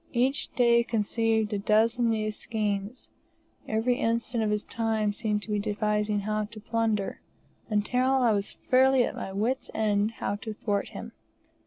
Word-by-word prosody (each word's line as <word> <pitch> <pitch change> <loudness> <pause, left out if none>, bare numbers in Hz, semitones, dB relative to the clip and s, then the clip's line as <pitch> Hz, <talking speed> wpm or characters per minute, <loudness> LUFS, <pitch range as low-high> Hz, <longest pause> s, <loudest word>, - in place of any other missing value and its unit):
Each 260 +3 +1
day 235 -1 +4
conceived 225 -1 0
a 205 - 0
dozen 225 +3 +2
new 215 -1 0
schemes; 210 +1 -3 0.6
every 225 +3 +1
instant 230 0 0
of 215 - 0
his 210 0 -1
time 220 -2 0
he - - -2
seemed 210 -1 -1
to 215 - -6
be 210 - +1
devising 210 0 0
how 215 +1 -1
to 215 +1 -11
plunder, 225 -2 -1 0.5
until 245 +5 +1
I 250 -4 +3
was 200 -1 -1
fairly 260 0 +5
at - - -2
my - - -6
wits' 225 +7 -1
end 210 0 +1
how 205 -2 -3
to 215 +1 -7
thwart 205 -2 -1
him. - - -8
220 Hz, 165 wpm, -27 LUFS, 210-235 Hz, 0.6 s, fairly